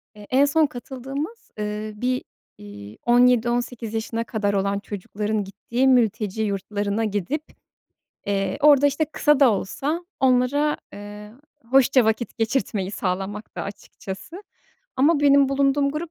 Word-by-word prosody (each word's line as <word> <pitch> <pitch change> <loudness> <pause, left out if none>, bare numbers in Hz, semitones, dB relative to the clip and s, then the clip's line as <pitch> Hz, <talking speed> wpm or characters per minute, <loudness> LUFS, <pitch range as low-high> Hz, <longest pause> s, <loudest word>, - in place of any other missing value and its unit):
Eee, 210 -1 -13
en 270 +3 +4
son 310 +2 +3
katıldığımız, 275 - -7
ııı, 210 0 -5
bir, 255 +1 0 0.3
iii, 100 +1 -11
17-18 240 -1 +2
yaşına 225 +1 -2
kadar 205 -3 -1
olan 200 0 0
çocukların 205 +1 -3
gittiği 235 +6 -1
mülteci 220 -4 +2
yurtlarına 205 +1 -2
gidip, 215 - -2 0.8
eee, 195 -1 -1
orada, 285 -1 +6
işte, 285 +3 +1
kısa 295 -1 +2
da 270 -4 +7
olsa 290 - -3 0.2
onlara, 265 +3 +2 0.2
eee, 205 +1 -10 0.4
hoşça 265 -1 +5
vakit 220 +2 -1
geçirtmeyi 220 -4 -1
sağlamaktı, 195 +2 -4
açıkçası 200 - -8 0.5
ama 290 +3 +3
benim 280 -1 +5
bulunduğum 280 +1 +2
grup 310 +3 -5
235 Hz, 125 wpm, -23 LUFS, 205-275 Hz, 0.8 s, da